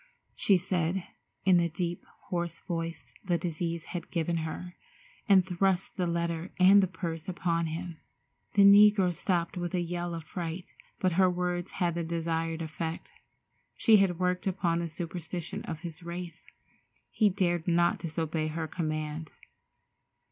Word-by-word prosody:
she 195 - +4
said, 180 0 -1 0.4
in 185 -2 +6
the 170 -1 +2
deep, 170 +2 -3 0.3
hoarse 170 -3 -2
voice 165 -2 -4 0.2
the 175 -3 +1
disease 170 -1 -3
had 175 -2 -5
given 170 0 0
her, 165 +2 -5 0.6
and 190 -2 +6
thrust 185 0 0
the 180 -3 0
letter 170 0 -2
and 195 +2 +8
the 190 - +2
purse 170 -1 -5
upon 170 -2 0
him. 170 +1 -5 0.6
The 200 - +7
negro 200 -2 +7
stopped 170 0 -1
with 175 +1 -2
a - - +2
yell 175 0 -3
of 165 - -6
fright, 170 +1 -6 0.3
but 185 -4 +2
her 185 - +6
words 180 0 -2
had 175 -3 0
the 170 0 -2
desired 165 0 -2
effect. 160 +1 -5 0.6
She 220 -2 +6
had 190 -4 +2
worked 180 +1 0
upon 175 -3 +1
the 170 -1 -2
superstition 175 +3 -5
of 160 -2 -5
his 165 -2 -7
race. 170 -1 -7 0.6
He 215 -2 +4
dared 175 -3 0
not 170 0 +3
disobey 160 -1 -2
her 160 +1 -3
command. 155 -1 -3
175 Hz, 150 wpm, -29 LUFS, 165-180 Hz, 0.6 s, and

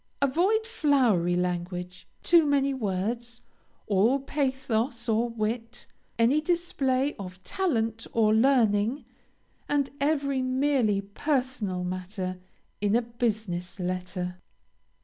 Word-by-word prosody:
Avoid 360 +11 +2
flowery 255 - +2
language, 180 0 -3 0.2
too 340 -1 +6
many 275 -1 +2
words, 230 +1 -3 0.4
all 215 +6 +3
pathos 260 -4 -1
or 230 +1 +2
wit, 230 +1 -3 0.3
any 245 +7 +4
display 290 -5 0
of 185 -1 -8
talent 225 - -1
or 215 -2 +3
learning, 230 0 +3 0.6
and 285 -2 +1
every 280 -2 +1
merely 255 -5 +2
personal 215 -4 -2
matter, 185 0 -4 0.4
in 205 +1 +2
a 240 - +3
business 215 -7 -3
letter. 180 0 -3
230 Hz, 100 wpm, -27 LUFS, 195-275 Hz, 0.6 s, too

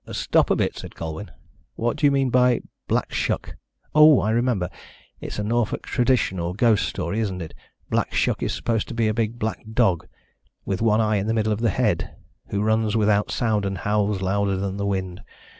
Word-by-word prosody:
"Stop - - +2
a - - +3
bit," - - 0
said - - -9
Colwyn. 80 +5 -6 0.5
"What 120 +1 -1
do 145 - +3
you - - +3
mean 135 -2 +1
by 125 -1 +3 0.3
Black - - -1
Shuck? - - -2 0.4
Oh, 150 -2 +7
I 110 - 0
remember. 115 -6 +1 0.5
It's - - -6
a 105 - -2
Norfolk 115 +1 -1
tradition 125 -7 +1
or 85 +1 -3
ghost 110 -1 +3
story, 105 - -3
isn't 100 -5 -2
it? 80 -3 -7 0.3
Black - - 0
Shuck - - 0
is - - -1
supposed 115 -3 -1
to - - -7
be 115 -1 +1
a 110 - +1
big 115 +1 -1
black 110 -1 -3
dog, 110 -8 +1 0.6
with 95 0 -2
one 115 -1 +3
eye 110 -1 +2
in 100 +1 -2
the 110 - +1
middle 110 -1 +1
of 105 - -4
the 115 - +2
head, - - 0 0.3
who 100 0 -1
runs 110 0 +1
without 105 -1 +2
sound 110 -3 0
and 95 -1 -2
howls 105 0 0
louder 100 0 0
than 95 0 -3
the 100 0 -2
wind. 95 -2 -3
105 Hz, 205 wpm, -23 LUFS, 100-115 Hz, 0.6 s, Oh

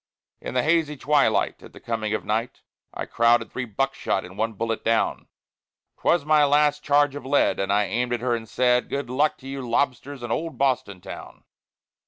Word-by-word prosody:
In - - -6
the 125 - +2
hazy 160 -2 +1
twilight, 145 +2 +2
at - - -14
the - - -12
coming 110 -2 -3
of - - -5
night, 115 +4 -2 0.3
I - - -5
crowded 115 0 +2
three 130 - -3
buckshot 120 -3 -1
and 90 +1 -12
one 110 +2 -1
bullet 115 +2 -3
down. 115 0 0 0.7
'Twas 170 -4 +2
my 155 -1 +5
last 150 +1 +3
charge 145 -1 +3
of 145 - -7
lead; 140 +2 +2
and 95 0 -1
I 105 +1 +3
aimed 120 +4 -1
her 120 0 0
and 110 -2 -7
said, 125 -1 +2
"Good 140 -3 -3
luck 145 +4 +1
to 135 - -13
you, 135 0 -5
lobsters, 130 +2 -1
in 120 - -4
old 165 0 -3
Boston 125 -9 0
Town." - - -10
125 Hz, 190 wpm, -24 LUFS, 115-145 Hz, 0.7 s, my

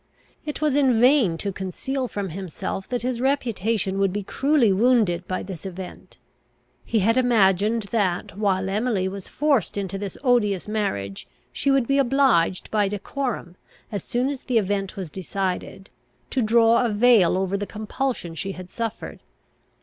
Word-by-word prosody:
It 300 - -4
was 305 -2 +2
in 265 -5 +3
vain 245 - +4
to 200 +3 -3
conceal 250 +8 -3
from 200 -4 -4
himself 190 +2 -5
that 245 -1 -2
his 250 -1 -2
reputation 225 -7 0
would 195 -1 +2
be 205 +2 -3
cruelly 270 -1 +2
wounded 205 -5 +2
by 185 - -2
this 185 -4 -8
event. 185 -1 -9 0.7
He 225 -2 0
had 225 +5 +3
imagined 220 -2 +3
that, 190 -7 0
while 190 -2 0
Emily 205 -1 0
was 195 0 -6
forced 280 - 0
into 195 -1 -3
this 200 -2 -5
odious 215 -8 +2
marriage, 100 - -3 0.3
she 280 - 0
would 270 -3 +3
be 275 +3 +2
obliged 260 -10 +2
by 210 -2 +2
decorum, 205 -2 -4 0.3
as 205 -4 -4
soon 250 +3 0
as 280 -2 -4
the 245 - 0
event 200 -2 -1
was 185 -6 -5
decided, 190 +1 -4 0.4
to 260 - +1
draw 230 +1 +4
a 240 - +1
veil 210 -5 +4
over 190 +1 -1
the 200 0 -3
compulsion 215 -3 -3
she 195 +5 -4
had 185 0 -10
suffered. 230 -2 -5
210 Hz, 160 wpm, -24 LUFS, 190-245 Hz, 0.7 s, vain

